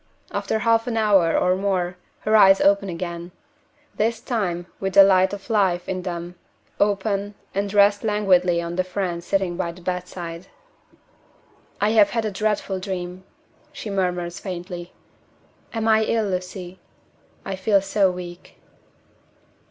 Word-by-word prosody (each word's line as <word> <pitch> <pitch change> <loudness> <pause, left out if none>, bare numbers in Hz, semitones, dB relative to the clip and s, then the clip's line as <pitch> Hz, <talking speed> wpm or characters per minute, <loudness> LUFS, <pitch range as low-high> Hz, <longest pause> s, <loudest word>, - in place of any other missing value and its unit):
After - - -1
half 225 +2 +2
an 230 -2 -1
hour 195 -6 +4
or 180 0 +3
more, 185 -2 -1 0.3
her 215 +1 +2
eyes 195 -2 +7
open 200 0 +3
again 170 0 -5 0.7
this 225 +2 +1
time 180 -8 -2
with 195 0 -3
the 200 - +10
light 190 -1 +4
of 200 -1 -8
life 190 -6 +1
in 185 -1 -3
them 175 -1 -5 0.5
open, 205 0 0 0.2
and 200 0 -1
rest 205 0 +4
languidly 185 -5 +2
on 170 +1 -5
the 185 - +2
friend 180 -2 -3
sitting 180 -1 -1
by 170 -2 -2
the 175 +2 -14
bedside. 175 -1 -5 1.3
"I 210 +1 +2
have 210 -2 +5
had 230 -2 -1
a 215 - -1
dreadful 205 -1 -1
dream," 185 -1 -5 0.5
she 210 - -7
murmurs 180 -3 -2
faintly. 175 -2 -6 0.8
"Am 225 -1 -2
I 220 0 +5
ill, 225 -1 +1
Lucy? 185 -1 -5 0.7
I 195 - -3
feel 200 +2 +3
so 195 0 +2
weak." 180 -1 -9
190 Hz, 145 wpm, -23 LUFS, 180-205 Hz, 1.3 s, the